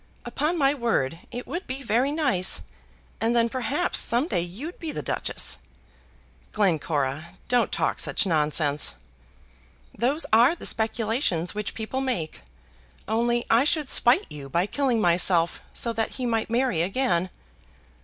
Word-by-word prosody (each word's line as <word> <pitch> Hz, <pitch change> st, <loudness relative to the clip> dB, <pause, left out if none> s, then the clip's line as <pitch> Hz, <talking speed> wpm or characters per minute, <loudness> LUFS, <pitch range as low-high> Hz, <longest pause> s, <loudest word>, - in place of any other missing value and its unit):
"Upon 310 Hz, +5 st, -1 dB
my 275 Hz, -2 st, +3 dB
word 225 Hz, -, -1 dB
it 245 Hz, +1 st, -6 dB
would 350 Hz, +3 st, -5 dB
be 265 Hz, +2 st, -5 dB
very 250 Hz, +4 st, +1 dB
nice; 265 Hz, -, +1 dB, 0.6 s
and 230 Hz, +2 st, +2 dB
then 235 Hz, 0 st, +3 dB
perhaps 275 Hz, +8 st, 0 dB
some 245 Hz, +6 st, +2 dB
day 180 Hz, -, 0 dB
you'd 220 Hz, -, -7 dB
be 325 Hz, -2 st, -4 dB
the -, -, -5 dB
Duchess." -, -, -2 dB, 0.9 s
"Glencora, 155 Hz, -6 st, -1 dB
don't 245 Hz, -1 st, +2 dB
talk -, -, 0 dB
such -, -, 0 dB
nonsense." 150 Hz, -, +2 dB, 1.0 s
"Those 270 Hz, +8 st, 0 dB
are 240 Hz, +9 st, +6 dB
the -, -, -9 dB
speculations 220 Hz, -, 0 dB
which 210 Hz, -1 st, -4 dB
people 225 Hz, +4 st, -3 dB
make. 235 Hz, -13 st, -3 dB, 0.7 s
Only 235 Hz, +2 st, +1 dB
I 230 Hz, +3 st, +4 dB
should 300 Hz, -1 st, +1 dB
spite 240 Hz, +2 st, +4 dB
you 140 Hz, -2 st, -8 dB
by 170 Hz, +6 st, +1 dB
killing 250 Hz, +1 st, 0 dB
myself, 175 Hz, -2 st, +2 dB
so 235 Hz, -, -2 dB
that 225 Hz, -1 st, -2 dB
he 255 Hz, -, -4 dB
might 225 Hz, -2 st, 0 dB
marry 240 Hz, -7 st, +1 dB
again." 185 Hz, -2 st, 0 dB
230 Hz, 145 wpm, -25 LUFS, 175-260 Hz, 1.0 s, are